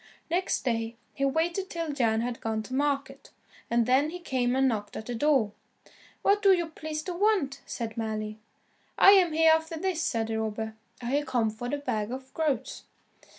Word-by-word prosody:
Next 360 -2 0
day, 230 -2 -1 0.2
he 275 - 0
waited 340 +7 0
till 335 -2 -3
Jan 225 -5 +2
had 240 0 -3
gone 220 -1 -2
to 255 - -9
market, 275 -1 -1 0.4
and 235 0 +3
then 265 +5 +3
he 350 - -6
came 255 -7 0
and 265 0 +3
knocked 210 -4 -2
at 220 - -6
the 245 - -4
door. 260 -4 +2 0.7
"What 405 +1 +4
do 400 -2 +6
you 340 -3 0
please 310 -1 -5
to 365 - -4
want?" 350 -8 +1
said 230 -2 -5
Mally. 215 -1 -3 0.6
"I 390 - +9
am 370 -4 +6
Hereafterthis," 320 +2 +2
said 230 -7 0
the 220 0 -1
robber, 220 0 -3 0.3
"I 240 - -2
have 290 +2 0
come 230 -3 +1
for 245 +3 -6
the 290 - -1
bag 220 -6 -2
of 260 +1 -7
groats." 300 -7 -2
270 Hz, 185 wpm, -28 LUFS, 225-320 Hz, 0.7 s, I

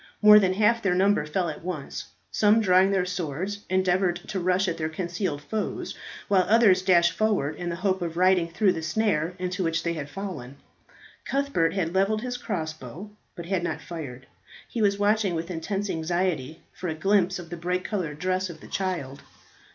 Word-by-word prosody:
More 210 0 +9
than 190 -2 +2
half 225 +3 +3
their 195 -4 +1
number 195 -3 +2
fell 175 +3 0
at 155 0 -6
once; 170 -6 -5 0.3
some, 210 +1 +4
drawing 190 -2 +4
their 190 -2 +1
swords, 180 +2 -3
endeavoured 185 -1 +2
to 190 - -2
rush 185 +2 +1
at 170 - -2
their 155 0 -1
concealed 170 -2 -3
foes, 215 +7 -3 0.3
while 195 -2 +4
others 210 -4 +5
dashed 175 -2 +4
forward 200 -9 0
in 175 +2 -4
the 170 - -2
hope 190 +1 0
of 170 -1 -4
riding 180 -2 +3
through 190 +2 +2
the 165 - -4
snare 165 -1 0
into 180 0 -2
which 165 -1 0
they 170 - 0
had 150 -3 -5
fallen. 145 -8 -6 0.7
Cuthbert 275 -13 0
had 175 -3 -1
levelled 200 +3 +1
his 250 -1 -3
crossbow, 160 - -5 0.2
but 170 - -7
had 185 0 0
not 160 -2 -2
fired; 145 -7 -8 0.4
he 230 - -3
was 200 -1 +3
watching 205 -2 +2
with 165 +2 -4
intense 195 +5 -3
anxiety 165 -3 -2
for 180 - -5
a 160 - -2
glimpse 190 +1 +2
of 175 -2 -10
the - - -3
bright 180 +2 -2
coloured 175 -8 -3
dress 185 +2 -1
of 165 -2 -9
the - - -13
child. 170 -8 -3
180 Hz, 190 wpm, -26 LUFS, 165-195 Hz, 0.7 s, More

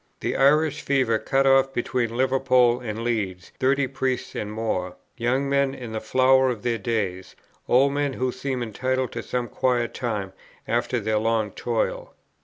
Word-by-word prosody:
The - - -1
Irish 150 +2 +3
fever 130 -5 +1
cut 135 +4 +1
off 135 0 +4
between 120 -2 -1
Liverpool 130 -2 +3
and 115 -2 -5
Leeds 100 -7 -2
thirty 135 +1 +2
priests 130 -1 -2
and 105 0 -4
more, 95 -5 -2 0.2
young 130 +3 0
men 140 -1 +1
in 120 -3 -8
the 110 0 -4
flower 130 +3 +4
of 115 -5 -4
their 120 -2 0
days, 100 -6 -3 0.3
old 135 +3 +4
men 145 -1 0
who 130 0 -1
seemed 130 0 -3
entitled 130 +3 -2
to - - -4
some 125 -1 -3
quiet 120 +1 0
time 105 -6 -3 0.3
after 120 +1 0
their 110 0 0
long 110 -1 0
toil. - - -2
125 Hz, 165 wpm, -24 LUFS, 115-135 Hz, 0.3 s, off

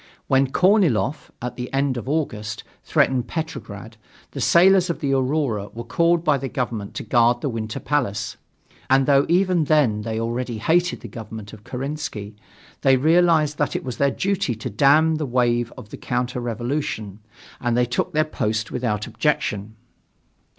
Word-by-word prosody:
When 135 0 +3
Korniloff, 160 - +2
at 125 0 -4
the 125 0 -5
end 135 -1 +1
of 120 +2 -5
August, 110 -9 -2 0.2
threatened 130 -2 +1
Petrograd 115 -10 -6 0.3
the - - -5
sailors 185 +1 +5
of 170 - -2
the 140 -1 0
Aurora 130 -6 0
were 120 - -5
called 170 +7 +2
by 150 -4 +2
the 135 0 -4
government 115 -7 -4
to - - -4
guard 120 +2 +3
the 140 - -1
Winter 110 -2 -4
Palace, 120 -8 -1 0.5
and 135 0 +4
though 140 0 +4
even 180 -2 +3
then 135 -9 +2
they 110 +1 -3
already 120 +1 -3
hated 175 +10 +1
the - - -8
government 110 -1 -9
of 105 -1 -12
Kerensky, 130 -6 -5 0.5
they 135 -1 +5
realized 160 0 +3
that 145 -3 0
it - - -2
was 125 -3 -5
their 140 - +3
duty 190 - -1
to 110 - -6
dam 150 +8 +4
the 155 - -2
wave 120 -1 +1
of 105 - -10
the - - -8
counter 125 0 -2
revolution, 120 -3 -3 0.4
and 120 -1 0
they 125 - +3
took 120 0 -2
their 155 0 +2
post 110 -7 -2
without 105 -4 -2
objection. 110 -8 -1
125 Hz, 165 wpm, -22 LUFS, 115-150 Hz, 0.5 s, sailors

